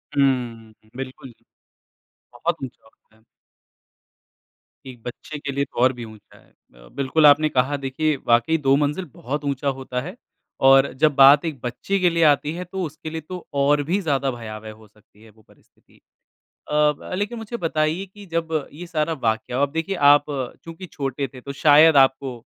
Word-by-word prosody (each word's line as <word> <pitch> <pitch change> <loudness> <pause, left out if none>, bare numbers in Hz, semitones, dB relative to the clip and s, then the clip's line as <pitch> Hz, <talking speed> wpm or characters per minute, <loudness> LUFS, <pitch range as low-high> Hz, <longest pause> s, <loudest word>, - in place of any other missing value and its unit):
हुँ, 120 -5 0 0.2
बिल्कुल। 130 -1 -8 1.0
बहुत 165 +8 -2
ऊँचा 130 - -9
होता 110 0 -28
है। 110 - -29 1.6
एक 125 -3 -11
बच्चे 140 +5 -8
के 145 -2 -5
लिए 140 +1 -1
तो - - -9
और 130 +1 +4
भी 120 -1 -8
ऊँचा 110 -2 -16
है। - - -24
अ, - - -22
बिल्कुल 140 +3 +1
आपने 150 +1 +6
कहा 140 +1 0
देखिए 140 +3 -1
वाक़ई 120 +7 +3
2 135 -2 +2
मंजिल 150 +5 -1
बहुत 145 +4 -5
ऊँचा 140 0 -2
होता 130 -2 -3
है, 180 - -8 0.4
और 135 +1 +5
जब 150 -3 +4
बात 140 +3 +7
एक 150 -6 -4
बच्चे 125 +11 -2
के 180 -1 +3
लिए 165 0 +1
आती 150 +1 +3
है 180 +1 -5
तो 190 +1 -5
उसके 155 +1 -8
लिए 160 0 -5
तो 180 +3 -9 0.2
और 145 +1 +3
भी 180 +7 0
ज़्यादा 140 -4 0
भयावह 110 -2 -8
हो 110 0 -16
सकती 105 0 -27
है 110 - -16
वो 110 +1 -23
परिस्थिति। - - -27 0.7
अ, - - -6
ब 150 -1 +1
लेकिन 210 +3 -3
मुझे 225 +2 -6
बताइए 165 +1 -1
कि 200 +1 -15
जब 160 -2 -2
ये 175 +4 -9
सारा 160 -1 -1
वाक्या 110 +2 -1
हुआ 140 +1 +2
अब 140 - -18
देखिए 165 +4 -2 0.2
आप 145 0 +4
क्योंकि 160 +7 -7
छोटे 140 -3 -4
थे 125 - -10
तो 140 +2 -7
शायद 150 +1 +6
आपको 135 -2 +3
140 Hz, 185 wpm, -22 LUFS, 125-160 Hz, 1.6 s, बात